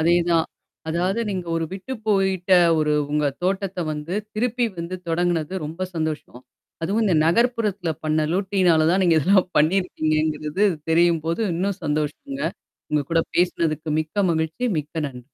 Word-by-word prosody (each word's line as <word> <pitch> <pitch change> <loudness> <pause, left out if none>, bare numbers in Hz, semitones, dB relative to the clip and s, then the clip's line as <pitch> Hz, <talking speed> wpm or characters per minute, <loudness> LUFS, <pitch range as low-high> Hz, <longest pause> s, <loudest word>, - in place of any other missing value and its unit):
அதேதான். 170 0 +3 0.4
அதாவது 180 +7 0
நீங்க 185 -3 -4
ஒரு 165 - 0
விட்டு 195 +7 -6
போயிட்ட 190 -2 +1 0.3
ஒரு 150 -1 +1 0.2
உங்க 150 0 +1 0.2
தோட்டத்த 190 0 -1
வந்து, 150 +5 -5 0.2
திருப்பி 245 +2 0
வந்து 170 +2 -4
தொடங்கனது 175 0 0
ரொம்ப 165 +5 -4
சந்தோஷம். 155 -6 -4 0.4
அதுவும் 205 +7 +1
இந்த 185 -5 +2
நகர்ப்புறத்தில 210 -2 +1
பண்ண 155 0 +1
லூட்டியினால 185 -4 +2
தான் 190 - +2
நீங்க 170 -3 +4
இதெல்லாம் 185 +4 +3
பண்ணியிருக்கீங்கங்கிறது 155 0 +1 0.3
தெரியும்போது 165 +2 +2
இன்னும் 195 +3 -1
சந்தோஷங்க. 155 - -2 0.5
உங்க 150 - +2
கூட 165 0 +3 0.2
பேசினதுக்கு 165 -3 0
மிக்க 175 +6 -1
மகிழ்ச்சி. 160 +9 -1
மிக்க 150 +2 -4
நன்றி. 125 -2 -11
170 Hz, 135 wpm, -23 LUFS, 155-195 Hz, 0.5 s, நீங்க